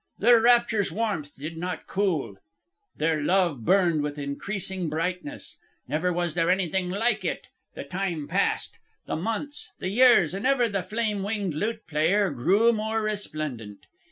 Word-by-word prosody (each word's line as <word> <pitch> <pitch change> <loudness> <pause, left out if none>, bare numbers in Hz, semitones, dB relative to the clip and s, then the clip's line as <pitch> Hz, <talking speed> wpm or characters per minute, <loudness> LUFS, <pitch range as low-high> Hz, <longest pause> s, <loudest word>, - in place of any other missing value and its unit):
Their 235 +1 +5
rapture's 235 -3 +3
warmth 200 -10 -2
did 155 +4 -6
not 175 -1 -4
cool. 175 - -1 0.6
Their 155 0 +1
love 170 -6 +1
burned 175 - +3
with 145 0 -3
increasing 185 +5 -3
brightness. 180 - -4 0.3
Never 170 +4 0
was 175 -2 -1
there 165 0 +1
anything 185 0 +1
like 225 +6 0
it. - - -3 0.3
The - - -5
time 180 -6 -3
passed, - - -1 0.3
the - - -3
months, 225 - -3
the 185 - -3
years, 210 - +5
and 200 +6 -1
ever 260 -3 +3
the 200 -3 -2
flame 210 +1 -2
winged 200 -3 -2
lute 220 +8 -3
player 180 +5 +2
grew 195 - +3
more 220 0 -1
resplendent. 155 - -5
190 Hz, 150 wpm, -26 LUFS, 160-215 Hz, 0.6 s, Their